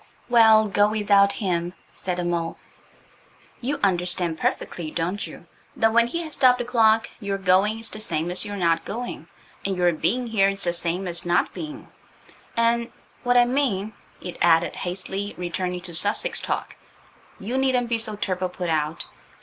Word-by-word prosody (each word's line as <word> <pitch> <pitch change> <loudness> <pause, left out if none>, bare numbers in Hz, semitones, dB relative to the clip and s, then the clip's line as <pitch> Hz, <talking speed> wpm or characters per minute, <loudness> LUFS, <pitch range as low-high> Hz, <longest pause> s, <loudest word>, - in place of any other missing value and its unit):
"Well, 220 -2 +6
go 205 +1 +3
without 200 -2 +3
him," 175 -4 -2 0.2
said 180 -1 -4
the 180 - -2
mole. 170 -1 -2 1.0
"You 280 +3 -2
understand 175 -3 +1
perfectly, 165 -3 -2
don't 175 +5 -3
you, - - -12 0.3
that 225 0 +2
when 235 0 +4
he 335 +8 -3
has 310 -2 -8
stopped 255 -2 +4
the 245 - -3
clock 225 -2 +3
your 200 -3 -2
going 195 +3 +3
is 225 0 -1
the 215 - -7
same 170 -5 0
as 180 - +2
your 205 0 -5
not 165 -3 +1
going, 240 +3 -6 0.4
and 195 -1 -1
your 175 -1 +3
being 245 +10 0
here 210 -4 +2
is 195 0 -5
the 175 - +1
same 175 +2 -1
as 170 -1 -1
not 175 - +1
being, 305 -2 -7 0.7
and–What 235 +1 0
I 245 - +6
mean," 240 -6 0 0.3
it 180 - -7
added, 170 0 +4
hastily 195 +2 -4
returning 180 +1 -3
to 175 -1 -8
Sussex 220 - +1
talk, - - -4 0.6
"you 225 +6 -5
needn't 255 -3 +1
be 230 -1 +1
so 220 -1 -2
turble 185 -2 -2
put 180 -2 -3
out. 155 +1 -1
200 Hz, 170 wpm, -24 LUFS, 175-230 Hz, 1.0 s, Well